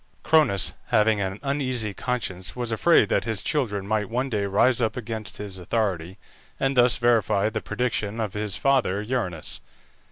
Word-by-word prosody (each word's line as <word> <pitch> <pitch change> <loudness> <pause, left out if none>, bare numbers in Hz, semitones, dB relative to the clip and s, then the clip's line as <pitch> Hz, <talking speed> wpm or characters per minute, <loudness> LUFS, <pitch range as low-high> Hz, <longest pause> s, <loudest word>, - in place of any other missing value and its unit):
Cronus, 150 - +3
having 105 -1 +3
an 95 +1 -3
uneasy 130 -6 -1
conscience, 95 -7 -3
was 120 -2 -3
afraid 165 +10 +4
that - - +1
his 110 -4 -2
children 110 -10 -1
might 105 0 -1
one 130 +3 -2
day 105 -2 0
rise 115 +6 +3
up 110 +1 0
against 110 -4 -5
his 100 -2 -5
authority, 95 -2 -2 0.4
and 135 0 +1
thus 125 -1 +5
verify 115 -4 +2
the 110 -1 -3
prediction 110 -1 -2
of 105 -4 -2
his 105 -1 -2
father 125 -8 +1
Uranus. 105 -9 -3
110 Hz, 160 wpm, -25 LUFS, 100-125 Hz, 0.4 s, thus